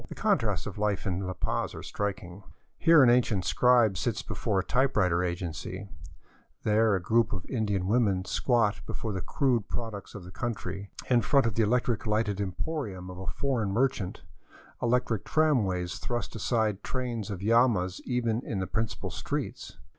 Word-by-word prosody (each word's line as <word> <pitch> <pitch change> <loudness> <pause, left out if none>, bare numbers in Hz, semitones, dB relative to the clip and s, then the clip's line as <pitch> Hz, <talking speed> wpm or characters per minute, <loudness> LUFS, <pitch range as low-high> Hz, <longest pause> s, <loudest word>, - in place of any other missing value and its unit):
The - - -7
contrasts - - +1
of - - -6
life 105 -2 0
in 95 0 -1
La 95 - -2
Paz - - -2
are - - -7
striking. 100 -2 -4 0.4
Here 165 -4 +7
an 120 - +6
ancient 115 -7 +2
scribe 120 -7 +4
sits 115 -2 -1
before 105 -4 -2
a 95 - +2
typewriter 105 -10 +2
agency; 90 +2 -4 0.7
there 110 0 +3
a - - 0
group 110 +5 +2
of 95 -3 -4
Indian 105 -6 -1
women 100 -3 +2
squat 110 +1 +1
before 110 -3 -4
the 95 - -3
crude 120 - 0
products 110 -4 -5
of 100 - -7
the 90 - -10
country, 100 -3 -4 0.2
in 120 -2 +4
front 135 +5 +3
of 115 - 0
the 115 - +1
elec 120 +3 +3
tric 115 -2 -2
lighted 105 -2 0
emporium 95 - -4
of 90 - -9
a 95 - -7
foreign 125 -7 -1
merchant; 100 -6 0 0.6
electric 120 -3 +1
tramways 105 - +1
thrust 120 -3 -3
aside 110 -2 0
trains 120 -5 -3
of 100 -2 -5
llamas 110 -5 +3
even 120 -2 0
in 110 - -3
the 95 - -1
principal 110 +3 -3
streets. - - -4
105 Hz, 170 wpm, -28 LUFS, 95-120 Hz, 0.7 s, Here